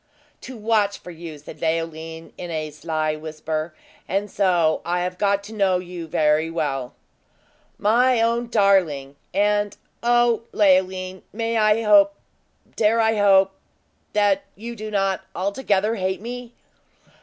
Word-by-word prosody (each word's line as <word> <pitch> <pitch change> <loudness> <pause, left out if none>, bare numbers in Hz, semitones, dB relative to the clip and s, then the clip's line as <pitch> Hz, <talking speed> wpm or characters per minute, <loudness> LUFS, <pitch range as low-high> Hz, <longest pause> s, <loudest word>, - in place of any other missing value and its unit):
"To 260 - -8
watch 210 -2 +1
for 180 - -11
you!" 165 -2 -9
said 150 +1 -12
Leoline, 165 0 -3
in 175 - -7
a 155 -2 -3
sly 155 0 -2
whisper. 155 +1 -4 0.3
"And 195 +2 -1
so 175 -5 +2
I 175 +1 -1
have 180 0 -3
got 200 -1 +2
to 210 +2 -10
know 195 -4 +2
you 175 -2 -7
very 155 +1 +2
well!" 140 -6 -3 0.8
"My 240 +4 +3
own 235 +1 +1
darling! 185 - +2 0.2
And, 205 +1 +1 0.2
O 240 -1 +3
Leoline! 185 -2 +2
may 230 +1 -2
I 215 0 +3
hope 200 -2 +5 0.6
dare 225 +1 +3
I 225 0 +3
hope 195 -1 +5 0.6
that 205 -2 +3
you 235 +4 -7
do 215 -1 -6
not 195 -2 0
altogether 200 +1 0
hate 190 -3 -2
me?" 240 +2 -7
195 Hz, 135 wpm, -23 LUFS, 165-215 Hz, 0.8 s, hope